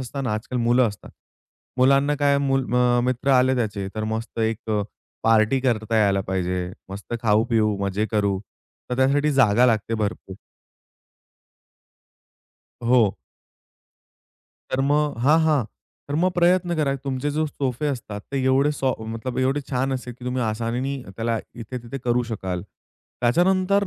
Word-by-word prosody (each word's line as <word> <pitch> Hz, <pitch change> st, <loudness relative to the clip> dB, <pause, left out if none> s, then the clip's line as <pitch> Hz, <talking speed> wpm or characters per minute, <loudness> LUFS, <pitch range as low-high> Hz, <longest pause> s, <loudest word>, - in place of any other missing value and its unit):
असतं 135 Hz, +2 st, -5 dB
ना 115 Hz, -, -1 dB
आजकाल 125 Hz, +3 st, -4 dB
मुलं 120 Hz, 0 st, +3 dB
असतात. 100 Hz, -, -11 dB, 0.7 s
मुलांना 140 Hz, +3 st, +4 dB
काय 140 Hz, 0 st, +4 dB
मूल 135 Hz, -1 st, +2 dB
अ, 125 Hz, 0 st, +3 dB
मित्र 130 Hz, +2 st, 0 dB
आले 130 Hz, +1 st, +4 dB
त्याचे 100 Hz, -4 st, -2 dB
तर 110 Hz, 0 st, -2 dB
मस्त 115 Hz, +1 st, -6 dB
एक 110 Hz, 0 st, -1 dB
अ, 105 Hz, -1 st, +1 dB, 0.4 s
पार्टी 115 Hz, +3 st, +3 dB
करता 115 Hz, -3 st, 0 dB
यायला 100 Hz, -2 st, +3 dB
पाहिजे, 90 Hz, -1 st, -2 dB, 0.2 s
मस्त 100 Hz, +4 st, -6 dB
खाऊ-पिऊ, 110 Hz, -1 st, +2 dB
मजे 100 Hz, +3 st, -1 dB
करू 100 Hz, -3 st, +1 dB, 0.5 s
तर 125 Hz, -, -1 dB
त्यासाठी 140 Hz, +3 st, +3 dB
जागा 125 Hz, -2 st, +4 dB
लागते 115 Hz, -1 st, +1 dB
भरपूर. 100 Hz, -3 st, -4 dB, 2.5 s
हो. 120 Hz, -4 st, +3 dB, 1.6 s
तर 130 Hz, -, 0 dB
मग 150 Hz, -3 st, +1 dB
हां, 155 Hz, +3 st, +5 dB
हां, 150 Hz, -2 st, +3 dB, 0.5 s
तर 145 Hz, -, -3 dB
मग 185 Hz, -, +3 dB
प्रयत्न 175 Hz, 0 st, +3 dB
करा 140 Hz, -2 st, +1 dB
तुमचे 135 Hz, +2 st, -1 dB
जो 155 Hz, -, +2 dB
सोफे 135 Hz, 0 st, -2 dB
असतात 105 Hz, -4 st, -8 dB
ते 135 Hz, -1 st, 0 dB
एवढे 135 Hz, +3 st, +3 dB
सो 130 Hz, -1 st, +1 dB, 0.2 s
मतलब 125 Hz, +2 st, -4 dB
एवढे 135 Hz, +3 st, +1 dB
छान 130 Hz, +1 st, 0 dB
असेल, 125 Hz, -2 st, -5 dB
की 125 Hz, -, -11 dB
तुम्ही 125 Hz, 0 st, -1 dB
आसानीने 115 Hz, +5 st, -2 dB, 0.2 s
त्याला 115 Hz, 0 st, -1 dB, 0.2 s
इथे-तिथे 120 Hz, +2 st, -7 dB
करू 120 Hz, +1 st, +2 dB
शकाल. 95 Hz, -4 st, -3 dB, 0.6 s
त्याच्यानंतर 185 Hz, +9 st, +2 dB
125 Hz, 145 wpm, -23 LUFS, 110-135 Hz, 2.5 s, हां